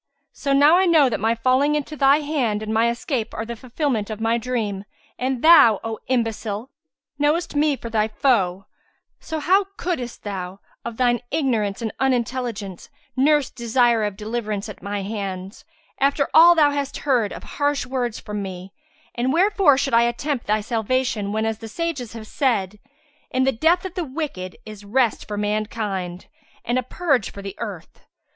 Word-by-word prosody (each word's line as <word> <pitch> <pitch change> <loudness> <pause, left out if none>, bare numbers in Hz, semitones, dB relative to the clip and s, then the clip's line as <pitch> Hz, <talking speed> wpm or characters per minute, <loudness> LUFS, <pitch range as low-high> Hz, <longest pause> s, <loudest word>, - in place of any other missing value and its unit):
So 280 - -3
now 290 +5 +6
I 380 - +3
know 310 -6 +5
that 220 - -2
my 225 +2 +1
falling 260 +5 +2
into 300 +1 -3
thy 280 +1 +4
hand 255 -8 -1
and 215 0 -3
my 225 +1 +3
escape 235 0 -3
are 220 - -3
the 235 +1 -5
fulfillment 245 -2 -2
of 215 -1 -5
my 225 +1 +1
dream, 220 -5 -2 0.4
and 255 -1 -2
thou, 310 - +7
O 225 -1 -4
imbecile, 230 -1 -2 0.5
knowest 300 +3 +1
me 295 0 +3
for 235 -3 -8
thy 215 -1 +2
foe; 200 -6 +1 0.5
so 320 - -5
how 380 +6 +3
couldest 255 -10 -4
thou, 190 -2 -5 0.2
of 235 -1 -6
thine 245 -1 +2
ignorance 235 -8 -1
and 220 - -3
unintelligence, 240 -6 -2 0.3
nurse 290 +1 +3
desire 235 -1 +2
of 205 -2 -3
deliverance 215 -1 -3
at 210 - -10
my 200 0 -3
hands, 195 +2 -5 0.3
after 280 +1 +2
all 340 +2 +8
thou 295 -3 +5
hast 285 -1 -3
heard 245 -7 +2
of - - -8
harsh 290 -2 -1
words 250 -3 -2
from 210 -1 -5
me; 190 0 -7 0.4
and 245 +2 0
wherefore 365 -3 +4
should 275 -2 -1
I 230 - +6
attempt 240 +3 -1
thy 215 +1 +2
salvation 225 -1 -1
whenas 220 0 -1
the 225 - -8
sages 275 -3 -4
have 225 -2 -8
said, 210 -6 -1 0.5
'In 260 0 +1
the 270 - +3
death 330 +9 +2
of 375 - -5
the 360 - -2
wicked 265 - -5
is 215 -1 -10
rest 230 +2 0
for 210 - -4
mankind 205 -4 -3 0.4
and 240 +2 +1
a - - 0
purge 265 - 0
for 200 - -10
the 195 -1 -6
earth'? 200 -8 -7
235 Hz, 175 wpm, -22 LUFS, 210-280 Hz, 0.5 s, all